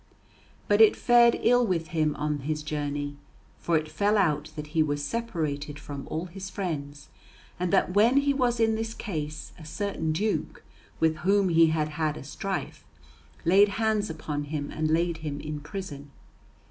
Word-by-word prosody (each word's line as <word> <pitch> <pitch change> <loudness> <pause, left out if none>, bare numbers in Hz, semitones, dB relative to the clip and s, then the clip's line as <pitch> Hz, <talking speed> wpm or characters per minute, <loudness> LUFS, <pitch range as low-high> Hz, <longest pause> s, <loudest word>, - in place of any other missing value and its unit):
But 205 +1 +4
it 220 - +7
fared 240 -1 +5
ill 245 +1 +5
with 175 -6 -1
him 155 -3 +1
on 150 0 -2
his 150 +2 -3
journey. 145 -1 -3 0.4
For 170 -1 +2
it 155 0 -2
fell 200 +8 +1
out 155 -6 +1
that 150 0 -7
he 160 - +3
was 145 -1 0
separated 155 -11 -3
from 145 -1 -8
all 160 +3 -3
his 190 +2 -8
friends, 145 -7 -5 0.5
and 180 -1 -1
that 180 - +2
when 225 +6 +5
he 280 0 +3
was 245 -3 +1
in 225 -1 +3
this 225 +1 -3
case 155 -6 -5
a - - -11
certain 160 -1 -2
duke, 205 +7 -2 0.4
with 160 -1 +2
whom 195 +4 +2
he 165 -1 +6
had 155 -1 0
had 155 0 -1
a - - -8
strife, 195 +7 -4 0.6
laid 195 +4 +6
hands 220 -2 +1
upon 150 -2 -4
him, 145 -1 -4
and 155 0 -1
laid 170 +1 +1
him 150 -3 -5
in 150 0 -5
prison. 145 -2 -7
160 Hz, 170 wpm, -27 LUFS, 150-200 Hz, 0.6 s, it